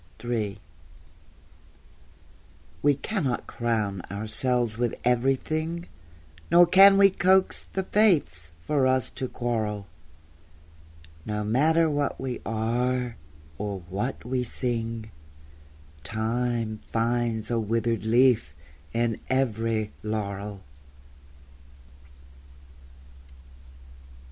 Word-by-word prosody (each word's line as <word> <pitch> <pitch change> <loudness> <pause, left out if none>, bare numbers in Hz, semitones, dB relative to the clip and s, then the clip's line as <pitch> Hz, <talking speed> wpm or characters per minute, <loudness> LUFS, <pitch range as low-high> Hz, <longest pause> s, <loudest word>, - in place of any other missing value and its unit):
III 110 -5 -2 2.2
We 145 +5 +4
cannot 145 - -2
crown 110 -5 -2
ourselves 110 +3 -1
with 120 +1 -2
everything, 155 +7 0 0.6
Nor 175 +1 +7
can 195 +3 +7
we 195 0 +7
coax 190 +1 +2
the 190 - -1
Fates 160 - +2
for 140 -3 +2
us 130 -1 +1
to 130 - -4
quarrel: 110 -4 -2 1.4
No 105 +1 -3
matter 155 +10 +3
what 145 -2 -1
we 130 -2 -4
are, 120 +2 -1 0.4
or 100 -2 -4
what 110 +8 -3
we 125 0 -1
sing, 115 -2 -3 0.9
Time 110 +2 -2
finds 115 -1 -1
a 115 - +1
withered 115 +1 -1
leaf 115 - +3 0.4
in 115 -1 0
every 115 -4 0
laurel. 100 -2 -4
120 Hz, 85 wpm, -26 LUFS, 110-135 Hz, 2.2 s, Nor